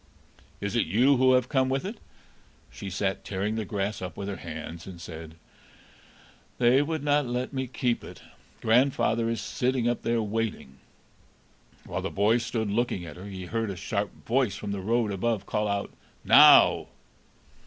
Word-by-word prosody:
"Is 100 +2 -3
it 120 - +2
you 125 - +4
who 130 0 +5
have 125 -1 +3
come 130 -2 +1
with 135 +5 -1
it?" 210 +3 -6 0.7
She 80 +11 -7
sat 95 +1 -2
tearing 100 +2 -2
the 110 -1 -3
grass 100 -1 -3
up 90 0 -6
with 100 0 -4
her 100 - -4
hands, 85 +1 -8
and 90 -3 -9
said: 80 -1 -9 1.2
"They 125 +3 +4
would 155 0 -2
not 145 -2 +2
let 125 +3 -3
me 130 -1 -2
keep 120 -1 -1
it; - - -11 0.4
grandfather 115 -1 +2
is 115 - -2
sitting 125 -1 -1
up 120 - 0
there, 115 0 0
waiting." 105 -11 -4 1.1
While - - -4
the - - -3
boy 105 +4 +2
stood 115 -3 -2
looking 105 -5 -1
at 75 - -9
her, 90 +2 -10
he 95 -2 -7
heard 115 +3 -2
a 100 - -4
sharp 100 +2 -4
voice 120 -4 +1
from 100 0 -5
the 100 -1 -3
road 115 +2 +1
above 105 +2 -1
call 105 -1 -1
out, 100 0 -2 0.3
"Now!" - - +7
110 Hz, 175 wpm, -27 LUFS, 95-125 Hz, 1.2 s, Now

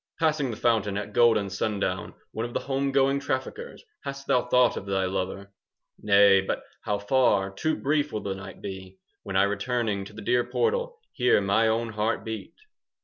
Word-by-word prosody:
10 160 - +3
Passing 150 -4 0
the 110 - -5
fountain 110 -4 +1
At 105 - -5
golden 110 -5 +4
sundown, 100 -3 -2 0.2
One 110 - -3
of 120 0 -6
the - - 0
home 135 0 -1
going 135 0 +3
Traffickers, 140 - -4 0.2
hast 140 0 -6
thou 125 -1 +1
Thought 125 0 +4
of 100 - -6
thy 95 -1 0
lover? 95 +1 -4 0.5
15 - - -19
Nay, 100 -1 +7
but 95 - -3 0.2
how 105 - -1
far 100 -3 +2
Too 155 +11 -1
brief 150 +1 0
will 105 - -3
the 100 - -2
night 95 0 -10
be, 95 -1 -7 0.2
When 95 - -6
I 95 - +5
returning 105 0 -1
To 105 - -12
the 110 0 -9
dear 120 +3 +2
portal 480 - -1 0.2
Hear 125 -4 +3
my 100 +3 +2
own 115 +1 0
heart 110 +1 -1
beat! 110 -2 -6
110 Hz, 195 wpm, -26 LUFS, 100-130 Hz, 0.5 s, Nay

